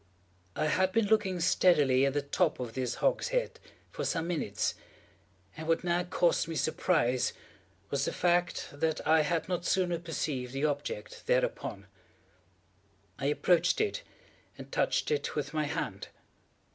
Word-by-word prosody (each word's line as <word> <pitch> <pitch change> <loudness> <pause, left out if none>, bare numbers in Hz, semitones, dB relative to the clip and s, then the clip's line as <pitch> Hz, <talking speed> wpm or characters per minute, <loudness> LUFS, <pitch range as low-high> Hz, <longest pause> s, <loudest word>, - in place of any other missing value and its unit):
I - - 0
had 185 +4 +2
been 225 +2 +2
looking 200 -4 +2
steadily 150 -6 +4
at 135 - -1
the 145 0 0
top 160 +3 0
of 120 -3 -5
this 125 -1 -2
hogshead - - 0 0.3
for - - -4
some 165 -1 -1
minutes, 150 - -1 0.8
and 160 - -7
what 165 +2 +2
now 175 0 +1
caused 175 -2 +1
me 165 - -4
surprise 155 -6 +1 0.6
was 140 0 0
the - - -1
fact 175 0 +1
that 160 +2 -1
I 160 0 +5
had 160 +2 -1
not 180 -2 -2
sooner 175 -2 +1
perceived 145 -6 -3
the 135 +2 0
object 145 -7 -4
thereupon. 100 0 0 1.3
I 140 - -1
approached 170 - +2
it, 435 +3 0 0.6
and - - -10
touched - - +1
it 445 - -1
with 145 0 -3
my 155 -1 0
hand. 150 - -4
160 Hz, 145 wpm, -30 LUFS, 140-180 Hz, 1.3 s, I